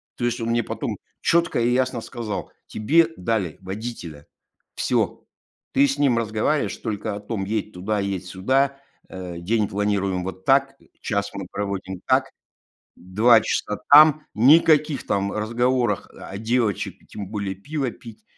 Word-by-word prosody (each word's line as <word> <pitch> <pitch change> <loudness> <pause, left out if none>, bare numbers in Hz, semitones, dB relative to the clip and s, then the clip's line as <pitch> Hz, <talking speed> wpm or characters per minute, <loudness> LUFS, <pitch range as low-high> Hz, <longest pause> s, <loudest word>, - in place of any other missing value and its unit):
То 120 - -2
есть 120 - -1
он 115 - -2
мне 120 0 +1
потом - - -4 0.2
чётко 170 -5 +2
и 120 - +2
ясно 130 -1 0
сказал: 110 -2 -5 0.2
"Тебе 160 +10 +3
дали 95 -4 -1
водителя. 95 -7 -7 0.5
Всё. - - 0 0.5
Ты 140 +1 +5
с 140 - -2
ним 135 -5 +3
разговариваешь 115 +6 0
только 105 -2 -4
о - - -5
том: 105 -1 -4
едь 105 0 -3
туда, 100 +4 -2
едь 100 -2 -3
сюда. 130 +10 0 0.3
Э, 90 -2 -7
день 105 +4 0
планируем 100 -2 -1
вот 95 0 -7
так. 135 0 +3 0.3
Час 100 -2 -1
мы 100 -2 -6
проводим 100 -2 -4
так. 130 +1 +3 0.7
2 110 +6 +4
часа 105 -1 -2
там, 155 +1 +8
никаких 150 +4 +4
там 100 0 0
разговоров 120 0 0
о 95 - -9
девочек, 115 -2 -1
и - - -23
тем 100 -2 -7
более 100 -2 -3
пиво 135 +6 -3
пить, 115 -3 -13
110 Hz, 150 wpm, -23 LUFS, 100-130 Hz, 0.7 s, там